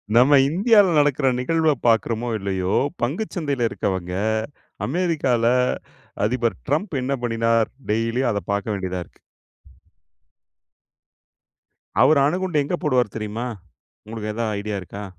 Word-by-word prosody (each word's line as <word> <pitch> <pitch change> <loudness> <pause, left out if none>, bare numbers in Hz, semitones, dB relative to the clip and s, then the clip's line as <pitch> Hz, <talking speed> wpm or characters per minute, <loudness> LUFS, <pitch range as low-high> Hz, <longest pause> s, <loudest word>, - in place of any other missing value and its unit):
நம்ம 135 +4 +6
இந்தியாவுல 200 +3 +4
நடக்குற 145 -2 +3
நிகழ்வப் 155 0 +1
பாக்குறமோ! 115 +1 +1
இல்லயோ! 95 -1 -1 0.3
பங்குச்சந்தையில 145 - -1
இருக்கவங்க, 95 -4 -3 0.7
அமெரிக்காவுல, 145 -7 0 0.8
அதிபர் 120 +1 -1
ட்ரம்ப் 155 +4 -1
என்ன 135 +1 0
பண்ணினார்? 115 -1 +1 0.2
டெய்லியும் 115 +3 0
அத 100 - -2
பாக்க 100 -1 -1
வேண்டியதா 95 -2 -3
இருக்கு. - - -28 2.8
அவரு 155 -2 +5
அணுகுண்ட 180 +1 -1
எங்க 175 - -2
போடுவாரு 125 -6 +2
தெரியுமா? 110 +3 -4 0.6
உங்களுக்கு 110 -1 -5
ஏதாவது 110 -2 -2
ஐடியா 105 0 -3
இருக்கா? 100 +3 -8
120 Hz, 105 wpm, -22 LUFS, 105-150 Hz, 2.8 s, நம்ம